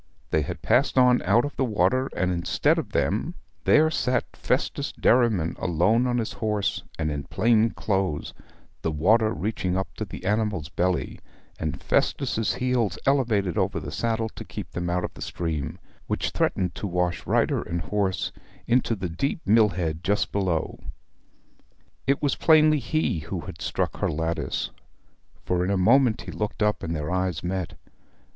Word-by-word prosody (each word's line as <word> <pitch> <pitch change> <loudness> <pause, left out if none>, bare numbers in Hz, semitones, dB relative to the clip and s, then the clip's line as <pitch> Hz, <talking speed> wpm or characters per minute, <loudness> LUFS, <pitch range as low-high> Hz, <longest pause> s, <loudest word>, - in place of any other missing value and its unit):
They 80 - +3
had 70 - -5
passed - - +2
on 125 -1 +5
out 120 - +4
of 145 - -6
the - - +2
water, 120 +3 +1
and 90 -1 +1
instead 85 -1 +1
of - - -5
them - - 0 0.3
there 155 +1 +5
sat 125 -4 -1
Festus - - -1
Derriman 110 -9 +2
alone 105 +9 +2
on 120 0 +1
his 115 -2 -2
horse, 105 -3 -1 0.2
and 80 -1 -1
in 70 -1 -4
plain 115 0 +3
clothes, 95 -9 -2 0.5
the - - 0
water 110 +9 +3
reaching 95 -4 -2
up 95 - -3
to 110 - -3
the 95 - -9
animal's 105 -6 0
belly, 90 +2 -1 0.4
and - - -3
Festus' 110 -1 +1
heels 125 -7 0
elevated 115 - +2
over - - 0
the - - -7
saddle 115 -1 -1
to - - -9
keep - - -8
them 85 -1 -3
out 90 +1 0
of - - -4
the - - -12
stream, 80 -5 -3 0.3
which - - -1
threatened 90 -2 0
to 105 - -4
wash 90 -1 -1
rider - - +2
and 85 0 -3
horse 95 +2 -1 0.3
into 120 -1 +2
the 95 -3 -3
deep 135 - -2
mill 110 +1 +5
head 85 -2 -3
just 100 +2 +1
below. 90 -5 -1 1.3
It 140 +2 +1
was 140 -3 +2
plainly 155 -1 +5
he 150 - 0
who 75 - -5
had - - -9
struck - - -2
her - - 0
lattice, 80 -3 -2 0.7
for 90 0 +1
in 90 - -1
a 100 - +2
moment 120 +4 +4
he - - -7
looked 105 +1 -2
up, 105 0 +1
and 80 0 -3
their 75 +1 -3
eyes 90 -3 -1
met. 90 -1 -3
100 Hz, 170 wpm, -25 LUFS, 85-115 Hz, 1.3 s, on